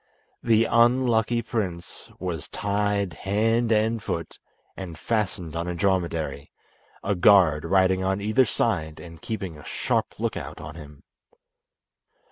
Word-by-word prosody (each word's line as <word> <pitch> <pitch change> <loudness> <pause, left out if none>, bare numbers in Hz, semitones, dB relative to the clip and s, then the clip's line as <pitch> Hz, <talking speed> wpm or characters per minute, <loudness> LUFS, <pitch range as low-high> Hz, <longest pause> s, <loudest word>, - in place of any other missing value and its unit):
The 115 -1 +3
unlucky 120 -1 +3
prince 95 -7 -4
was 85 -4 -4
tied 100 -2 -1
hand 115 +6 +1
and 110 +1 +2
foot, 85 -7 -5 0.4
and 90 -4 -7
fastened 95 -7 -2
on 85 +1 -2
a 90 - -3
dromedary, 85 -6 -1 0.5
a 100 - +1
guard 90 -5 +5
riding 95 +1 +3
on 95 +1 0
either 110 +6 +3
side 80 -10 -1
and 85 -1 -11
keeping 100 - -5
a - - -12
sharp - - -2
look - - -1
out - - -7
on 75 +1 -8
him. 75 -3 -12
95 Hz, 130 wpm, -25 LUFS, 85-110 Hz, 0.5 s, guard